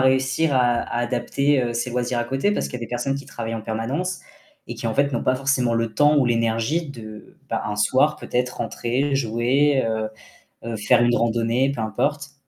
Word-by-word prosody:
réussir 130 +3 +2
à 120 -2 +3 0.2
adapter 125 +1 0
ses 120 +1 -2
loisirs 125 0 -1
à 120 - -1
côté 135 +11 0
parce - - -1
qu'il - - -11
y - - -8
a - - -4
des - - -20
personnes 125 +3 -1
qui 140 - -8
travaillent 115 -1 -5
en 115 - -4
permanence 130 +13 -3 0.5
et - - -6
qui - - -5
en 110 - -1
fait 140 -1 +2
ont - - -1
pas 130 - +2
forcément 130 -3 +1
le 115 -1 -1
temps 150 +1 +4
ou 140 - +4
l'énergie 115 +7 0
de 110 -5 -10
bah, - - -1
un 105 0 -3
soir 130 +8 +3
peut-être 125 -2 -2
rentrer, 125 +4 -1
jouer, 130 +3 +2
heu 110 -1 -1 0.6
heu, 115 -1 -3
faire 120 +3 +3
une 120 0 +3
randonnée, 115 +3 +1
peu - - -4
importe. 140 +7 -2
125 Hz, 200 wpm, -23 LUFS, 115-140 Hz, 0.6 s, temps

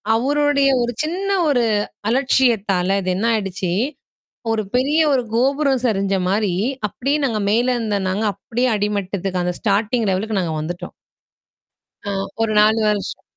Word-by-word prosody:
அவருடைய 280 +2 +2
ஒரு 240 0 0
சின்ன 370 +5 -3 0.2
ஒரு 245 -4 +2 0.5
அலட்சியத்தால 215 -7 +2
இது 185 0 -1
என்ன 220 +5 0
ஆயிடுச்சு? 195 -4 -2 0.8
ஒரு 220 -1 0
பெரிய 285 +5 +2
ஒரு 255 -2 +1
கோபுரம் 270 +1 +1
சரிஞ்ச 195 -3 +1
மாரி 200 -2 +1 0.3
அப்படியே 275 +8 -1
நாங்க 220 -4 -1
மேல 240 +3 +2
இருந்தோம் 205 -4 -1
நாங்க 210 +4 -1
அப்படியே 240 +6 -2
அடிமட்டத்துக்கு 195 -3 -2
அந்த 180 0 -2
ஸ்டார்டிங் 215 +2 +1
லெவலுக்கு 205 +2 -1
நாங்க 165 -2 -2
வந்துட்டோம். 175 +3 -6 1.1
அ - - -1 0.3
ஒரு 220 -1 +1
4 215 +1 +4
வருஷம். 205 -1 -3
215 Hz, 135 wpm, -20 LUFS, 195-255 Hz, 1.1 s, 4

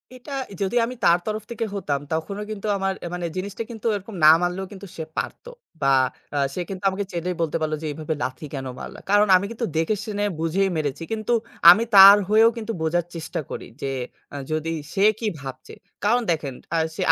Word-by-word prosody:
এটা 260 +3 -12 0.3
যদি 195 +4 -1
আমি 250 +2 -6
তার 170 - +6
তরফ 215 0 -3
থেকে 230 -1 -2
হতাম, 145 -8 -1
তখনও 200 +6 -3
কিন্তু 215 0 -5
আমার 195 0 0
আ - - -3
মানে 180 -1 -3
জিনিসটা 200 +4 -4
কিন্তু 225 0 -10
এরকম 200 +1 -7
না 155 - +11
মারলেও 180 +2 -1
কিন্তু 200 0 -10
সে 160 - -4
পারত। - - -4 0.4
বা 135 0 +3 0.4
আ - - 0 0.2
সে 180 - -3
কিন্তু 190 0 -6
আমাকে 195 +1 -3
চাইলেই 175 +1 -2
বলতে 165 -1 0
পারলো 155 0 0
যে 155 - -4
এভাবে 155 +1 -3
লাথি 130 +4 -4
কেনো 135 -2 -4
মারলা? - - -8
কারণ 205 +1 +5
আমি 190 +2 +2
কিন্তু 230 +1 -3
দেখে 165 +7 +1
শুনে 205 -1 -2 0.2
বুঝেই 180 +4 +1
মেরেছি। 145 0 -2
কিন্তু 220 +2 -1 0.4
আমি 205 +6 +8
তার 195 +1 +11
হয়েও 220 +2 +6
কিন্তু 225 0 -4
বোঝার 160 +1 +1
চেষ্টা 160 -1 -4
করি - - -6 0.2
যে 140 - -2 0.5
আ - - -6 0.2
যদি 155 +1 -1 0.2
সে 195 - +1 0.2
কি 225 - -2
ভাবছে? 135 -1 -9 0.3
কারণ 240 +4 +3
দেখেন 150 -4 -2 0.2
আ - - +3 0.2
সে - - -4
190 Hz, 205 wpm, -23 LUFS, 160-210 Hz, 0.5 s, না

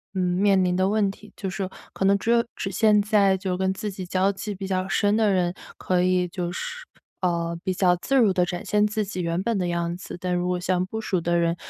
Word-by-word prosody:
嗯， - - -1 0.2
面 195 -1 +4
临 180 0 +1
的 185 +1 +2
问 205 -2 +2
题， 210 +1 -15
就 195 - -5
是 185 +1 -3 0.2
可 - - -3
能 200 +1 +5
只 230 +4 -1
有 235 0 +4
只 195 - -4
现 210 +2 +4
在 200 -3 +3
就 185 0 -3
是 180 - -1
跟 190 0 +1
自 210 +2 -4
己 190 -1 -7
交 190 +2 +1
际 200 +1 -5
比 195 +1 -6
较 185 0 -1
深 205 +1 +2
的 215 -2 +3
人 180 -2 +1 0.2
可 180 -1 0
以 180 0 +2
就 175 -1 -4
是 - - -5 0.4
呃， 170 -2 0
比 185 - +1
较 180 -1 +3
自 270 +10 -1
如 225 -7 +5
地 180 - +2
展 175 0 -5
现 210 0 +2
自 210 0 -1
己 185 -2 -4
原 170 +2 -1
本 230 -1 0
的 180 - 0
样 170 0 -1
子。 180 - -8
但 180 0 -2
如 180 0 0
果 180 0 0
像 180 0 0
不 220 +4 -5
熟 190 -4 0
的 170 +1 +1
人， 170 0 +1
185 Hz, 275 characters per minute, -24 LUFS, 180-205 Hz, 0.4 s, 能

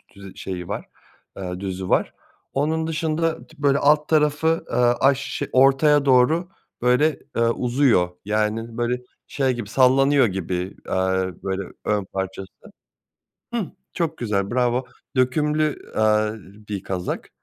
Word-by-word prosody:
dü 100 -1 -11
şeyi 90 -2 -5
var, - - -4 0.5
eee, 90 -1 -5
düzü 95 -1 -4
var. - - +2 0.4
Onun 160 +3 0
dışında 160 +1 -1
t 155 -2 -15
böyle 140 -1 +4
alt 150 +1 +3
tarafı, 155 +1 +2
eee, - - -2
aş 125 +3 +3
ş 140 +1 -4
ortaya 140 +2 +5
doğru 150 +8 +4 0.3
böyle, 130 +4 +3 0.2
eee, 115 - +1
uzuyor, 120 -5 +2 0.2
yani, 110 +2 -1
böyle 120 +1 -1 0.3
şey 135 -2 0
gibi, 120 -4 -6
sallanıyor 135 +2 +4
gibi, 95 -2 -4 0.3
eee, - - -3 0.5
böyle 95 0 -2 0.2
ön 105 -2 0
parçası. 95 0 -4 1.1
Hıh, 230 -5 0 0.3
çok 165 -2 -2
güzel 100 -4 -1
bravo, 125 +1 +1 0.3
dökümlü, 150 +4 0
eee, 110 0 +3 0.4
bir 100 -2 -4
kazak. 90 -2 -4
125 Hz, 130 wpm, -23 LUFS, 105-150 Hz, 1.1 s, ortaya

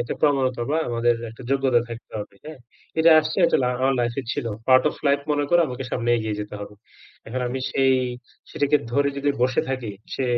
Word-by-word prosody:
একটা 120 - -3
প্রবনতা 130 -4 +2
বা 155 - +2
আমাদের 120 0 +2 0.2
একটা 115 +3 -12
যোগ্যতা 135 -3 +3
থাকতে 115 0 -10
হবে। 105 - -9
হ্যাঁ? 155 -2 -9 0.4
এটা 165 +1 +6
আসছে 155 0 -4
একটা - - +3
লা 125 - +2
আ - - -3
আমার 135 +1 +3
লাইফে 120 +2 -1
ছিল। 145 -5 -3 0.2
Part 130 0 +7
of - - -5
life 140 0 +3
মনে 145 0 +1
করে 175 0 +5
আমাকে 125 +1 -5
সামনে 120 -1 -1
এগিয়ে 110 -2 -3
যেতে 105 0 -7
হবে। 105 0 -8 0.5
এখন 130 +3 -4
আমি 130 +2 -3
সেই 135 -1 +3 0.6
সেটাকে 145 +1 +2 0.2
ধরে 140 +2 +2
যদি 140 +1 +1
বসে 125 0 +2
থাকি, 130 -5 -3 0.2
সে 135 - -1
130 Hz, 210 wpm, -23 LUFS, 120-140 Hz, 0.6 s, Part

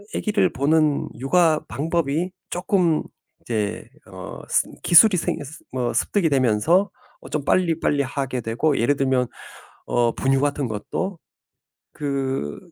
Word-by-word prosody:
아기를 200 -5 +1
보는 150 +2 +2
육아 155 +5 +3
방법이 160 +5 -1 0.2
쪼끔 175 -3 +1 0.4
이제 110 -1 -3 0.2
어 95 0 -9
스 - - +2 0.2
기술이 185 +3 +7
생겼으 150 -2 -4
뭐 125 -2 -2
습득이 195 -6 +1
되면서 140 - +2 0.3
어 - - -12
좀 150 -2 -2
빨리빨리 165 -4 +1
하게 130 -1 -3
되고 120 +7 0
예를 140 +5 +2
들면 130 -2 +1 0.6
어 120 -1 +1
분유 135 0 +1
같은 145 -2 0
것도 165 - -4 0.7
그 135 - -3
145 Hz, 240 characters per minute, -22 LUFS, 125-165 Hz, 0.7 s, 기술이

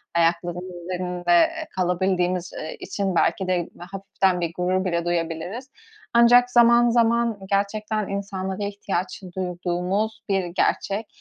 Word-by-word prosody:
ayaklarımızın 175 +1 -1
üzerinde, 180 0 -4
eee, 320 - +3
kalabildiğimiz, 180 -1 0
eee, 155 - -6
için 195 -3 -3
belki 190 +2 +1
de 180 -2 0
hafiften 190 0 -1
bir 170 -1 -2
gurur 185 +1 0
bile 170 -2 -1
duyabiliriz. 175 - -3 0.4
Ancak 245 +1 +6
zaman, 240 0 +6
zaman 235 -1 +2
gerçekten 210 +1 -1
insanlara 195 0 -4
ihtiyaç 200 -3 -3
duyduğumuz 185 +4 -2
bir 195 -2 +1
gerçek 195 +4 -1
190 Hz, 120 wpm, -23 LUFS, 175-215 Hz, 0.4 s, Ancak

